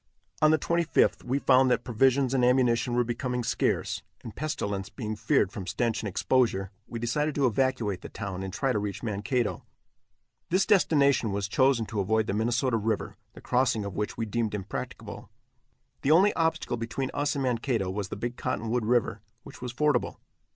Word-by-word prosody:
On 155 - +6
the 155 - +5
25th 170 +1 +1
we 130 +3 0
found 130 -2 +4
that 125 -1 +1
provisions 130 +2 +2
and 130 -2 +2
ammunition 125 -1 +3
were 120 - +3
becoming 125 +1 -2
scarce, 115 - 0 0.2
and 110 - -9
pestilence 100 -10 -3
being 110 -4 -5
feared 110 -1 +1
from 95 -3 -7
stench 115 +5 -1
and 105 - -3
exposure, 95 -2 +1 0.2
we 115 - -6
decided 145 +6 -1
to 140 - +2
evacuate 120 -5 0
the - - -8
town 100 -3 -5
and 95 0 -5
try 135 +7 0
to 105 - 0
reach 100 0 -4
Mankato. 110 +2 -1 0.9
This 185 +3 +2
destination 140 - +3
was 100 0 -2
chosen 130 +1 +2
to 110 -1 -4
avoid 110 +3 +1
the 100 - -2
Minnesota 120 +3 +1
river, 110 0 -2 0.2
the - - -13
crossing 125 -4 +1
of 100 - -6
which 105 0 -3
we 115 - -1
deemed 110 0 -1
impracticable. 100 -1 -6 0.7
The 135 - 0
only 185 +7 +5
obstacle 160 -6 0
between 115 +3 -3
us 145 0 0
and 140 - -1
Mankato 120 -5 0
was 100 0 -3
the - - -4
Big 120 +4 -4
Cottonwood 120 -2 -2
river, 120 0 +1 0.2
which - - -12
was 125 -1 -4
fordable. 145 0 +1
120 Hz, 180 wpm, -28 LUFS, 105-135 Hz, 0.9 s, On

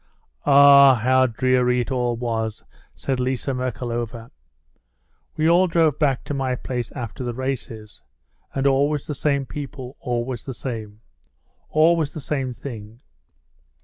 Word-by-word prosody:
"Ah, 140 -1 +8
how 130 +3 +3
dreary 125 +1 +1
it 120 - -5
all 125 -2 0
was!" 115 -2 -3 0.3
said 135 -2 -2
Liza 130 +1 -1
Merkalova. 120 -2 -4 1.1
"We 155 +1 +2
all 175 +3 +5
drove 165 -4 +2
back 140 -4 +1
to - - -5
my 135 -2 -1
place 125 -2 -4
after 120 -1 -6
the 120 -1 -4
races. 120 -5 -5 0.5
And 135 0 -1
always 140 +2 +2
the 150 - -4
same 140 -1 0
people, 135 -2 -8
always 120 -1 -3
the 130 - -7
same. 110 -5 -6 0.7
Always 160 -1 +2
the - - -4
same 135 -3 -3
thing. 115 -2 -9
130 Hz, 135 wpm, -22 LUFS, 120-140 Hz, 1.1 s, Ah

